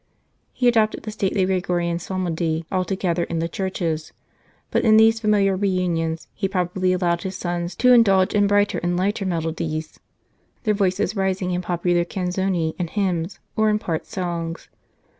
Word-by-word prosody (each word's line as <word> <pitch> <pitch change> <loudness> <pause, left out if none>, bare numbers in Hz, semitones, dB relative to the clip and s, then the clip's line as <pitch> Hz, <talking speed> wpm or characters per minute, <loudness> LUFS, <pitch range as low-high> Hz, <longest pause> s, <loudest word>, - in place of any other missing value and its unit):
He 250 - 0
adopted 220 -3 +2
the 215 - -5
stately 195 -2 0
Gregorian 175 -2 0
psalmody 170 -3 -2
altogether 185 -2 0
in 170 - -4
the 165 +1 0
churches, 170 -3 -3 0.6
but - - +1
in 220 -2 +6
these 225 +1 +5
familiar 205 -3 +2
reunions 175 -4 -1
he 195 - -1
probably 185 -1 0
allowed 175 -2 +1
his 190 0 -5
sons 175 0 -3
to 250 +4 +5
indulge 195 -6 +4
in 205 -1 +3
brighter 205 0 +2
and 175 0 -1
lighter 195 +2 0
melodies, 160 -2 -3 0.6
their 215 -3 +2
voices 195 0 0
rising 190 -2 -1
in 180 0 -1
popular 175 0 +1
canzoni 180 -2 -1
and 175 -2 -2
hymns, 180 -3 -1 0.2
or 220 0 +3
in 210 - +2
part 165 -6 -3
songs." 170 -2 -4
185 Hz, 155 wpm, -22 LUFS, 170-195 Hz, 0.6 s, in